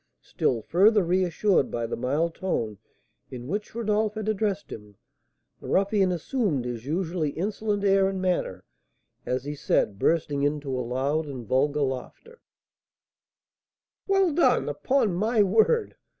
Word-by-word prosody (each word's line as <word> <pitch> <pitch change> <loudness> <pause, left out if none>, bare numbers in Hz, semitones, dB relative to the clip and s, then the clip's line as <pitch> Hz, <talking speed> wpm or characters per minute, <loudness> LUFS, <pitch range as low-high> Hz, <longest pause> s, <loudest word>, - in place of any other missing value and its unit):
Still 115 -4 -1
further 205 - +4
reassured 180 -1 +1
by 120 -1 -3
the 115 - -3
mild 145 +7 -1
tone 115 - -3 0.5
in 125 -1 -8
which 205 +7 -4
Rodolph 215 -1 0
had 215 -1 -4
addressed 205 -1 -1
him, 105 -1 -10 0.6
the - - -10
ruffian 195 -1 +2
assumed 175 - -1
his 120 0 -5
usually 165 -1 -1
insolent 205 +5 -2
air 195 -1 +4
and 190 -1 -4
manner 185 -1 -1 0.6
as 125 0 -1
he 145 +1 -4
said, 105 -8 0
bursting 150 -2 +1
into 145 -2 -1
a 125 - -1
loud 135 +6 -1
and 130 -4 -7
vulgar 145 +5 +1
laugh: 130 -2 -4 1.9
"Well 390 -4 +3
done, 345 - +3
upon 260 -8 +1
my 215 +4 +2
word! 225 - +2
175 Hz, 135 wpm, -26 LUFS, 135-205 Hz, 1.9 s, further